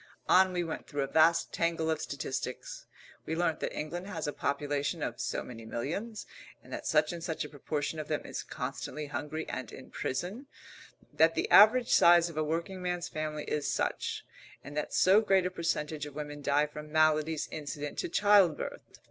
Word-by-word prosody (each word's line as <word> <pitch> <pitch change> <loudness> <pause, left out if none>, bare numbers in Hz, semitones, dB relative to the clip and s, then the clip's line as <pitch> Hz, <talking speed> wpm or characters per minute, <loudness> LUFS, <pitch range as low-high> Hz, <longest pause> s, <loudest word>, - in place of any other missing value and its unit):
On 185 0 +6
we 175 -1 -1
went 165 - -5
through 145 -1 -2
a - - -2
vast 160 +3 +3
tangle 165 -1 0
of 155 - -1
statistics. - - -5 0.4
We 160 - -1
learnt 165 -2 0
that - - -2
England 175 +5 -4
has 205 - -4
a 145 - -2
population 145 +3 -1
of 120 - -4
so - - -2
many 115 -2 -9
millions, 175 - -4 0.4
and - - -12
that - - -5
such 155 +1 +3
and 170 -1 -7
such 160 -2 -3
a - - -8
proportion 150 +2 -3
of 155 - -5
them 155 - -2
is - - -4
constantly 135 +3 -5
hungry 150 +3 -4
and 130 - -5
in 130 - -11
prison; 190 - -4 0.7
that 160 +1 +4
the - - 0
average 230 +4 +7
size 170 0 +6
of 160 - -12
a 155 - +2
working 170 +4 -3
man's 180 -1 -2
family 155 -1 -3
is 150 -1 -2
such, - - -2 0.4
and 145 +2 -9
that 150 - -2
so 195 +4 +5
great 195 -4 +3
a 180 - -1
percentage 155 -3 -2
of 145 - -12
women 145 -1 -6
die 145 +1 +2
from 150 0 -9
maladies 155 0 +2
incident 150 -1 -5
to - - -2
childbirth. 200 -5 +3
155 Hz, 190 wpm, -31 LUFS, 150-175 Hz, 0.7 s, average